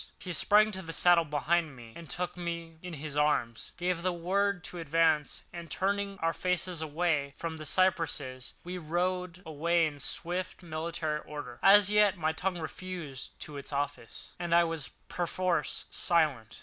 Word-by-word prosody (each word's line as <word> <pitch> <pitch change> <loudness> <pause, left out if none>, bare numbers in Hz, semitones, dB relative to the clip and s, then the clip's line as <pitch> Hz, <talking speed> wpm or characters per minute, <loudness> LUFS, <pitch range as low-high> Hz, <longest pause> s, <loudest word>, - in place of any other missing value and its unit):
He 180 - -5
sprang 210 +5 +5
to 190 -2 -5
the 165 -2 -6
saddle 170 +1 +5
behind 155 +1 +1
me, 115 -2 -12 0.2
took 180 0 -2
me 170 -2 -5
in 180 -1 -7
his 150 -1 -5
arms, 150 -6 +1
gave 180 -1 0
the 185 +1 +1
word 185 +2 0
to 175 - -6
advance; 160 -1 +2
and, 170 -1 -7
turning 200 +1 -1
our 165 0 +2
faces 180 -2 0
away 150 -3 0
from 165 -1 -4
the 155 -1 -4
cypresses, 145 -9 +1
we 180 +1 -5
rode 180 +2 -1
away 165 +2 +2
in 145 -2 -4
swift, 180 +5 -3
military 160 -1 -2
order. 145 -6 -8
As 200 +1 +7
yet 210 -3 +5
my 160 -1 +1
tongue 180 +3 -2
refused 165 -4 -6 0.2
its 140 -1 -7
office, 140 -5 -4
and 170 -1 +1
I 170 - +7
was 165 -3 -2 0.2
perforce 175 -2 0
silent. 145 -10 +1
170 Hz, 160 wpm, -31 LUFS, 150-180 Hz, 0.2 s, As